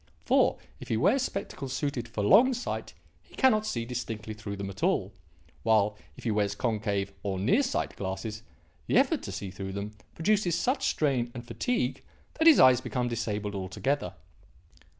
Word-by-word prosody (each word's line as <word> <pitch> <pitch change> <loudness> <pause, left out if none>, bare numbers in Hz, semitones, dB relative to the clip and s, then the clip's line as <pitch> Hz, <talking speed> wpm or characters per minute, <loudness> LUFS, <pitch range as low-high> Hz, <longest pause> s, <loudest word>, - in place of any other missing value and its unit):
For, - - +3 0.2
if - - -9
he 110 - 0
wears 200 - +3
spectacles 165 - -4
suited 135 -5 -2
for 110 -3 -3
long 240 - +6
sight 245 - -5 0.3
he - - -19
cannot 215 -5 +3
see 115 - -2
distinctly 115 -3 -5
through 105 -1 -6
them 100 0 -5
at 100 - -12
all; 95 +1 +1 0.5
while, 105 -2 +3 0.2
if - - -11
he 115 - 0
wears 105 -1 0
concave, 105 -4 -1
or 95 -2 -2
near 110 - +3
sight, 270 0 -2
glasses, 100 +3 -4 0.5
the - - +3
effort - - +3
to - - -6
see 95 - -5
through 95 0 -6
them 100 +2 -4 0.2
produces 180 -1 +2
such 255 +10 0
strain 130 -6 +1
and 120 -1 -7
fatigue 120 - -1 0.4
that 325 - +5
his 320 - +8
eyes 130 -1 +7
become 125 -1 -2
disabled 105 -3 -2
altogether. 100 +9 -2
115 Hz, 170 wpm, -28 LUFS, 100-155 Hz, 0.5 s, his